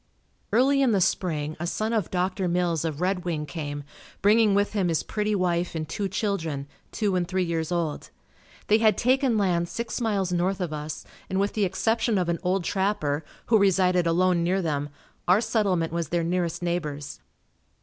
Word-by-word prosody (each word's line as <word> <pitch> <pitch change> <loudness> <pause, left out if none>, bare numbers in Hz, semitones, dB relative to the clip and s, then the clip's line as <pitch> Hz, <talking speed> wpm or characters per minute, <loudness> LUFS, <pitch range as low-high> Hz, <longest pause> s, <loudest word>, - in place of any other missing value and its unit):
Early 275 +4 +4
in 255 -4 +3
the 200 - +3
spring, 155 -4 0
a 175 - -2
son 215 +5 -1
of 220 -3 0
Dr. 185 +1 -1
Mills 170 -2 0
of 160 -1 -3
Red 185 0 0
Wing 160 -4 -2
came, 145 -1 -5 0.4
bringing 210 0 +5
with 205 +1 +1
him 195 -4 +1
his 165 -2 0
pretty 210 0 -1
wife 175 -2 0
and 155 -1 -3
two 200 -2 -3
children, 165 -8 -2 0.3
two 205 -4 0
and 175 -1 0
three 185 0 0
years 165 -1 -2
old. 170 -4 -2 0.6
They 215 +1 +4
had 215 -3 +4
taken 255 -1 +2
land 175 -4 +1
six 235 +1 -4
miles 200 -5 0
north 185 +2 0
of 175 -4 -3
us 150 0 -5 0.2
and 190 - 0
with 200 +1 0
the 210 -2 +1
exception 225 +4 +1
of 180 -2 0
an 170 - 0
old 185 0 0
trapper, 165 -6 0 0.2
who 225 -2 +4
resided 185 -3 +3
alone 175 +1 +3
near 185 +3 +1
them, 145 -5 -2 0.4
our 180 +3 +5
settlement 200 -8 0
was 170 -3 -2
their 170 -1 0
nearest 175 0 -1
neighbors. 150 - -3
180 Hz, 185 wpm, -26 LUFS, 170-205 Hz, 0.6 s, bringing